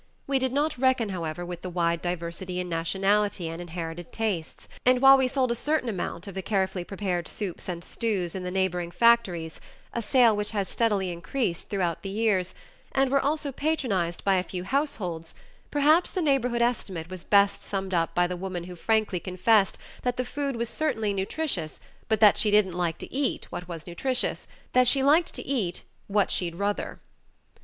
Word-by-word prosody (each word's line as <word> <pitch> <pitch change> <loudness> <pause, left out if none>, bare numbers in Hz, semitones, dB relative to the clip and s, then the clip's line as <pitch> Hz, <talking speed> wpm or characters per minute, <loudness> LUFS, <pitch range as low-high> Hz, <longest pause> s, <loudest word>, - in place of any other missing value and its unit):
We 275 -1 +1
did 260 -1 0
not 290 0 0
reckon, 260 -4 +2
however, 175 -2 -4
with 175 0 -6
the 185 - -5
wide 170 -1 0
diversity 175 +1 -4
in 180 - -3
nationality 190 +3 +1
and 165 +1 -5
inherited 170 0 -6
tastes, 205 -8 -3 0.2
and 250 0 +4
while 270 +1 +9
we 265 -1 +3
sold 255 -1 +1
a - - +3
certain 295 0 0
amount 180 -3 -4
of 200 - -7
the 190 - -3
carefully 190 -2 -1
prepared 180 -3 -3
soups 190 -3 -4
and 170 -1 -4
stews 195 -7 -2
in 190 - -4
the 180 - -4
neigh 190 +1 +2
boring 175 -1 -4
factories 180 -6 +2 0.3
a 235 - -1
sale 230 0 +4
which 210 0 -2
has 195 -2 0
steadily 205 -5 0
increased 170 +2 -2
throughout 180 -5 -1
the 195 - -5
years 195 -3 0 0.4
and 270 -1 +2
were 275 0 +4
also 295 0 -1
patronized 245 - -1
by 195 -1 +3
a - - +2
few 180 -1 -6
households, 190 - -2 0.3
perhaps 305 +4 +4
the 370 - -1
neighborhood 250 -5 +2
estimate 185 -8 -2
was 185 -2 -6
best 200 -1 +4
summed 190 -1 -3
up 165 -2 0
by 175 - +4
the 180 +1 -3
woman 180 -1 -4
who 180 0 -8
frankly 215 0 +1
confessed, 190 +3 +2 0.2
that 245 0 -1
the 255 - -1
food 280 0 -3
was 235 0 -1
certainly 225 -7 -1
nutritious, 195 - -2 0.3
but 220 -1 +2
that 210 -2 +6
she 215 - +2
didn't 205 -3 +4
like 175 -2 -1
to - - -9
eat 275 0 0
what 180 - -6
was 165 -3 -7
nutritious, 245 +9 -1 0.3
that 255 0 +5
she 270 +2 +3
liked 310 +5 +4
to - - -5
eat 215 -11 -1 0.2
"what 205 0 +2
she'd 170 -2 -1
ruther." 200 +3 -2
195 Hz, 190 wpm, -27 LUFS, 175-250 Hz, 0.4 s, while